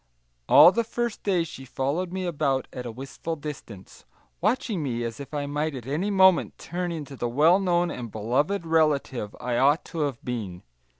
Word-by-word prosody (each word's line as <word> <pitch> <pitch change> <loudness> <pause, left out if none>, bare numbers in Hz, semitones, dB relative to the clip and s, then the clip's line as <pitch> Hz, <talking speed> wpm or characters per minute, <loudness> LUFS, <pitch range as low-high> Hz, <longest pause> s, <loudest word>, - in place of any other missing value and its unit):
All 175 - +9
the 235 +4 0
first 235 0 -3
day 185 -4 +1
she 145 -5 -9
followed 140 +7 -2
me 185 0 -3
about 140 -6 0
at 125 -1 -6
a - - -5
wistful 135 +7 -6
distance, 140 -10 -9 0.4
watching 210 -2 0
me 120 -5 -2
as 115 +1 -5
if 140 -1 -8
I 145 -1 -2
might 150 +1 -2
at 125 -3 -7
any 155 +10 -1
moment 190 -3 +4
turn 175 +1 -4
into 145 -4 -6
the 120 -2 -2
well 155 +9 +4
known 175 -2 +1
and 120 -3 -6
beloved 140 - 0
relative 150 -9 +1
I 120 -1 -2
ought 145 +5 +3
to 165 - -7
have 140 -6 -2
been. 105 -8 -5
150 Hz, 185 wpm, -26 LUFS, 125-175 Hz, 0.4 s, All